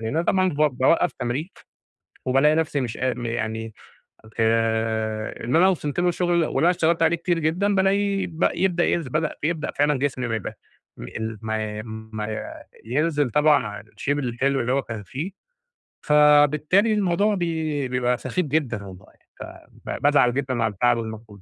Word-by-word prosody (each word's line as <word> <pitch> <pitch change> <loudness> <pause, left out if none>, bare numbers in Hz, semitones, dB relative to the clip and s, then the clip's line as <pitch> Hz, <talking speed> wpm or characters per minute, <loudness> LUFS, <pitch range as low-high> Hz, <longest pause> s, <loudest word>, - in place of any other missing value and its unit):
لإن 110 - -3
أنا 165 - +2
طبعًا 185 +1 +2
ب 150 - -3 0.2
باوقف 165 +6 +3
تمرين 130 +7 -3 0.8
وبالاقي 135 +4 +4
نفسي 155 -3 0
مش 120 -3 -4
قا 130 0 0
يعني 115 -2 -3 0.7
آآ 110 -1 0
اللي 125 +8 +2
أنا 185 +2 +6
وصلت 150 -4 -2
له 180 - +2
الشغل 175 0 0
واللي - - -2
انا 175 - +5
اشتغلت 165 -1 +1
عليه 165 +1 +3
كتير 170 0 -1
جدًا 180 +6 +1
بالاقي 195 +1 +1
ب 165 0 0
يبدأ 175 0 +1
ينزل 155 -7 -1
بدأ 155 +1 -1
بيبدأ 160 0 -1
فعلًا 145 -1 +1
جسمي 130 -3 -2
ما 115 - -1
يبقى 105 - -6 0.4
ال 110 -1 -6
ما 110 -1 -3
ما 110 -1 -6 0.3
ينزل 145 +2 0
طبعًا 150 -1 +3
عن 105 +1 -7
الshape 110 - -11
الحلو 135 +1 0
اللي 120 +1 0
هو 135 +1 +1
كان 110 -3 -7
فيه، 150 - -6 0.7
فبالتالي 150 +7 +4
الموضوع 205 +1 +1
بي 160 -6 -2
بيبقى 125 -1 0
سخيف 180 -2 -2
جدًا 130 -8 -1
والله 95 0 -13 0.3
ف - - -6 0.4
فبازعل 145 -4 +2
جدًا 130 -4 -1
على 110 -2 0
التعب 120 +4 +2
والمجهود 110 -2 -7
140 Hz, 165 wpm, -23 LUFS, 115-165 Hz, 0.8 s, أنا